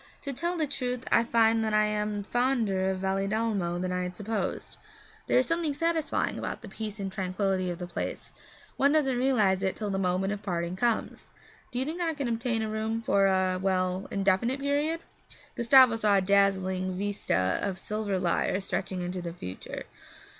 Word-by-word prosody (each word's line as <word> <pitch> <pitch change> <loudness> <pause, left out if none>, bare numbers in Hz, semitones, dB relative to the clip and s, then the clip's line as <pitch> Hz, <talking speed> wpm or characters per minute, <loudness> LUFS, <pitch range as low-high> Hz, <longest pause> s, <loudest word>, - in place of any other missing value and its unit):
To 280 - -3
tell 340 +7 -1
the 315 - +1
truth 255 -3 -3
I 230 - +5
find 225 -1 +3
that 215 -1 0
I 215 0 +4
am 210 -1 -1
fonder 225 -5 +1
of 190 -1 -2
Valedolmo 195 -1 0
than 180 0 -2
I 180 0 -1
had 180 0 -5
supposed. 215 +1 -3 0.5
There - - +3
is 255 - +4
something 330 -3 0
satisfying 330 -1 0
about - - -5
the - - -8
peace 215 -1 -6
and 195 -1 -3
tranquillity 190 -1 -1
of 175 - -4
the 180 - -5
place 175 - -5 0.4
one 280 +2 +4
doesn't 275 -5 +2
realize 220 -7 +2
it 190 -1 0
till 210 -2 -3
the 195 - -1
moment 190 +1 0
of 205 - -6
parting 175 -3 -2
comes. 235 +3 -1 0.4
Do 245 - -5
you 260 - +1
think 325 +4 -4
I 325 -2 0
can 280 -3 -2
obtain 230 -1 -1
a - - -2
room 220 +1 -1
for 200 -3 +3
a 185 -1 +2
well, 185 0 0
an 200 - -2
indefinite 200 +8 +2
period?' 290 +4 0 0.5
Gustavo 245 0 +6
saw 210 -2 +3
a - - +3
dazzling 190 -1 +2
vista 190 - 0
of 195 -2 -2
silver 210 0 -2
lire 180 +1 +1
stretching 190 -1 -3
into 180 +1 -4
the 170 -1 -5
future. 95 - -7
205 Hz, 190 wpm, -28 LUFS, 190-245 Hz, 0.5 s, Gustavo